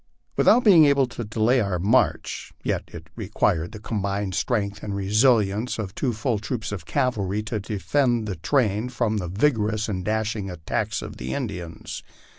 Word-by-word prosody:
Without 245 - +5
being 175 -8 +8
able 140 -2 +4
to 120 -1 -6
delay 110 +4 +2
our 100 -4 -1
march, 105 +9 +1
yet - - -1
it - - -10
required 80 +1 0
the 110 - -9
combined 100 -2 -2
strength 100 -3 -1
and 100 -2 -4
resistance 105 +2 +2
of 100 -4 -4
two 130 - -1
full 110 0 -1
troops 110 0 -4
of 90 -6 -6
cavalry 105 +1 0
to 110 0 -3
defend 115 +3 0
the 95 -4 -4
train 110 - +1
from 115 -3 0
the 90 -4 -3
vigorous 110 +1 +1
and 95 -4 -3
dashing 110 -1 -1
attacks 85 -4 -3
of - - -8
the 65 +1 -4
Indians. 85 -2 -5
105 Hz, 165 wpm, -24 LUFS, 100-120 Hz, -, being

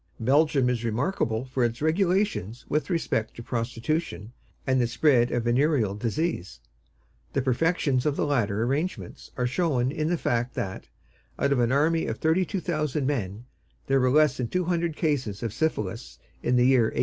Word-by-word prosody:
Belgium 140 +2 +3
is 125 -2 -1
remarkable 115 - -1
for 130 -1 -1
its 120 0 -1
regulations 160 - 0
with 150 +5 -1
respect 160 - -1
to 120 - -8
prostitution 120 - -3 0.3
and 130 -1 +2
the 120 - +2
spread 120 0 +3
of 120 - 0
venereal 120 -3 +2
disease. 115 - -3 0.7
The 140 - +1
perfections 135 0 +1
of 145 - +1
the - - 0
latter 110 -7 0
arrangements 145 +9 -3
are 125 - 0
shown 130 -2 0
in 155 +1 -2
the 175 - +1
fact 120 -3 -1
that, 95 -1 -4 0.5
out 140 - +1
of 140 - +2
an 120 0 +2
army 160 +4 +2
of - - -3
thirty 165 +4 +2
thousand 155 -7 -2
men, 115 -5 -2 0.4
there 135 0 +2
were 130 0 +3
less 150 0 +4
than 125 - -2
two 180 +8 -1
hundred 170 -2 -1
cases 130 - -1
of 115 -3 -3
syphilis 115 -6 -2 0.2
in 125 - +1
the 125 0 +4
year 130 -3 +5
1855. - - -5
130 Hz, 175 wpm, -26 LUFS, 120-155 Hz, 0.7 s, year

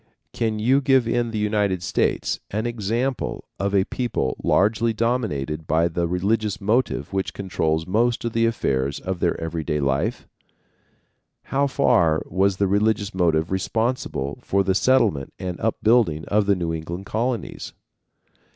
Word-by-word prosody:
Can 110 -2 -1
you 130 +6 +3
give 130 -3 +3
in 120 0 0
the 110 - -4
United 105 -4 0
States - - 0
an 110 +3 -2
example 120 +3 -2 0.2
of 100 0 0
a 95 - +4
people 120 - -2
largely 110 +3 +2
dominated 90 - -1
by 80 +3 +3
the 85 0 -1
religious 100 +4 0
motive 105 - 0
which 95 0 -2
controls 80 -5 -1
most 115 +6 +1
of 115 - -2
the 115 0 +3
affairs 70 - -1
of 95 -1 -4
their 85 - 0
every 80 0 -3
day 75 -1 -1
life? 70 - -1 1.2
How 140 +1 0
far 85 - +2
was 95 0 +1
the 100 - +2
religious 100 +1 +1
motive 85 -3 +1
responsible 95 - -2
for 100 0 +1
the 95 0 +1
settlement 105 - +2
and 90 -2 -5
upbuilding 110 -7 +2
of 105 -1 +2
the 100 - +4
New 85 -2 -2
England 85 +4 -5
Colonies? 115 +2 -3
100 Hz, 150 wpm, -23 LUFS, 85-115 Hz, 1.2 s, a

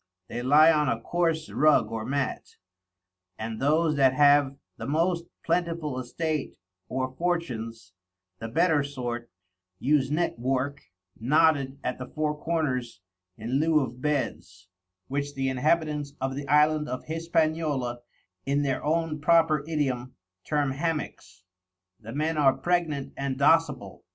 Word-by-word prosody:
They 120 - -4
lye 150 +6 +6
on 150 -3 +2
a 115 - 0
coarse 165 +3 -1
Rug 155 -5 +3
or 115 -1 -3
Matt, 135 +1 -3 0.8
and 110 0 -5
those 155 +2 +2
that 130 -2 +4
have 145 -1 +4 0.2
the - - -6
most 170 +3 +1 0.2
plentiful 165 -5 -1
Estate 150 +4 -3 0.3
or 130 0 -2
Fortunes, 115 - -3 0.5
the 115 - -5
better 160 +5 +2
sort, 120 -4 -5 0.5
use 135 +3 +2
Net 155 -4 -1
work, 135 +3 -1 0.4
knotted 140 +1 +2
at 125 - -3
the 130 - -6
four 150 +2 -2
corners 145 - -2 0.4
in 120 +5 -1
lieu 160 0 +3
of 125 -1 -5
Beds, 110 -11 -3 0.4
which 140 +1 -3
the 135 0 0
Inhabitants 150 +1 0
of 135 0 -2
the 140 0 -5
Island 150 +1 +3
of 130 - -5
Hispaniola, 155 -6 -1 0.4
in 140 +1 0
their 135 -2 -1
own 160 0 0
proper 160 -2 +4
Idiom, 130 -6 -2 0.3
term 145 -2 0
Hammacks. 140 - -4 0.6
The 115 0 -9
Men 155 +4 -1
are 135 -2 +5
pregnant 165 -6 -1
and 135 -1 -3
docible. 140 -7 +2
145 Hz, 135 wpm, -27 LUFS, 130-155 Hz, 0.8 s, lye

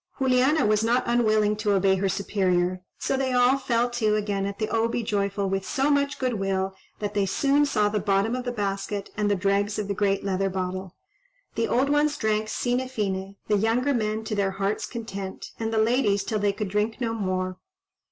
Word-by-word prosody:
Juliana 265 +2 +3
was 215 +1 +2
not 240 +3 +2
unwilling 215 -3 +2
to 210 -1 +1
obey 195 0 +3
her 195 +1 0
superior, 185 -2 0 0.2
so - - -1
they 265 -1 0
all 250 +2 +4
fell 240 -2 +1
to 215 -3 +1
again 200 -2 -1
at 200 0 -5
the 215 - -1
O 225 +1 +1
be 235 0 -2
joyful 200 -1 -1
with 195 0 -1
so 275 +8 0
much 285 0 +1
goodwill 195 -6 -1 0.2
that 205 -1 -4
they 200 -1 +1
soon 285 +8 +2
saw 210 -6 +2
the 210 0 0
bottom 200 +3 +1
of 255 - -3
the 245 - -2
basket 200 -2 -3
and 210 -1 0
the 205 - +3
dregs 200 +2 0
of 210 -2 -2
the 200 - -1
great 200 0 0
leather 195 0 0
bottle. 185 0 -4 0.6
The 230 - 0
old 270 +3 +2
ones 295 0 +2
drank 215 -2 0
sine 245 +3 -1
fine, 195 -5 -3
the 210 - +3
younger 235 +7 +1
men 215 -2 -1
to 220 - -4
their 200 -2 +1
hearts' 200 +2 -1
content, 200 -5 -6
and 225 -1 -2
the 225 - 0
ladies 220 -3 +2
till 215 -2 -2
they 205 0 +2
could 210 -1 -4
drink 210 +4 -1
no 230 -2 -1
more. 185 -3 -2
210 Hz, 205 wpm, -25 LUFS, 195-240 Hz, 0.6 s, all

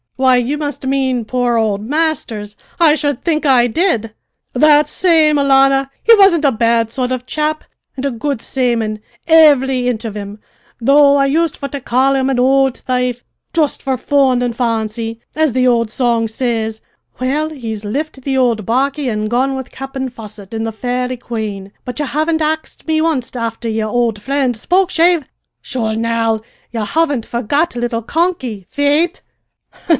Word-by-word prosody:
"Why, 260 0 +4
you 250 +4 -1
must 290 -2 -4
mean 260 -3 0
poor 245 0 0
old 210 -3 0
Masters! 245 -7 -2 0.2
I 325 -3 +5
should 290 -4 -1
think 315 -3 0
I 260 -4 +4
did." 235 - 0 0.4
"That 300 +2 +5
same, 310 -3 +3
alannah. 270 0 +3
He 460 - +7
wasn't 385 -7 +4
a 280 - +4
bad 230 -1 +1
sort 255 0 -2
of 255 -1 -3
chap, 305 +2 -2 0.3
an' 265 - -3
a 280 - 0
good 255 +2 -3
sayman, 230 -4 -1 0.3
ivvry 275 -6 +5
inch 235 -2 -2
of 215 -2 -5
him, 205 0 -7 0.4
though 280 +3 +5
I 275 - +3
used 320 +3 0
for 280 - -4
to 280 - -5
call 260 +3 +2
him 265 0 +1
an 260 -2 0
ould 265 0 +3
thaife 250 -1 -1 0.3
just 310 -4 0
`for 265 -2 -1
fun 265 -3 +2
an' 245 -1 -1
fancy' 225 -1 -2 0.2
as 310 -4 +1
the 255 0 +2
old 230 -2 +2
song 235 -1 0
says 225 -1 -2 0.4
well, 285 +5 0
he's 225 -8 -6
lift 275 +6 -4
the 265 0 -1
ould 235 -4 +1
barquey 270 +4 0
an' 215 -1 -2
gone 260 +4 0
with 265 -1 -6
Cap'en 265 0 -5
Fosset 215 -3 -11
in 225 0 -2
the 225 - -2
Fairi 250 +2 -2
Quane. 215 -5 -5
But 250 +3 -6
ye 295 - 0
haven't 315 +4 0
axed 315 +2 -3
me 315 0 +1
onst 300 -7 -1
afther 230 -1 -3
yer 220 -1 -1
ould 230 -2 0
fri'nd 265 +1 0
Spokeshave! 350 - +2 0.4
Sure, 225 -4 -2
now, 225 -1 0 0.3
ye 225 -2 -2
haven't 285 0 0
forgot 260 +7 -1
little 240 -1 -2
`Conky,' 260 - -2
faith!" 295 +5 +1
255 Hz, 170 wpm, -16 LUFS, 230-290 Hz, 0.4 s, He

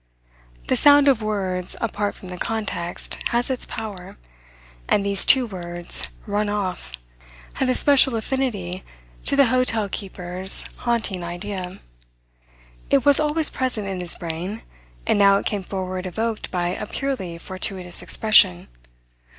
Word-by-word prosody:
The - - +2
sound 285 0 +6
of 260 -5 +4
words, 190 -4 -2
apart 205 -2 -2
from 185 - -12
the 180 - -7
context, 210 -6 -4
has 240 +2 -1
its 255 - -3
power; 205 -5 -7 0.7
and 200 - +2
these 200 -1 +4
two 260 -2 +8
words, 175 -4 -1 0.2
'run 205 0 -1
off,' 185 - -4 0.6
had 265 - -1
a 255 - +2
special 270 -3 +4
affinity 220 -7 -3 0.4
to - - +1
the 280 0 +5
hotel 230 -4 +1
keeper's, 185 -1 0
haunting 225 -7 -2
idea. 180 +1 -6 1.1
It 275 -2 +2
was 285 -1 +8
always 305 +1 +2
present 245 -6 -3
in 190 -1 -4
his 175 -1 +1
brain, 175 +6 -6 0.4
and - - +2
now 200 -1 +6
it - - -4
came 205 -2 -1
forward 185 -1 -5
evoked 220 +4 -3
by 175 -1 -1
a 200 +3 -5
purely 225 -13 -4
fortuitous 185 0 -4
expression. 90 - +4
200 Hz, 140 wpm, -22 LUFS, 180-235 Hz, 1.1 s, two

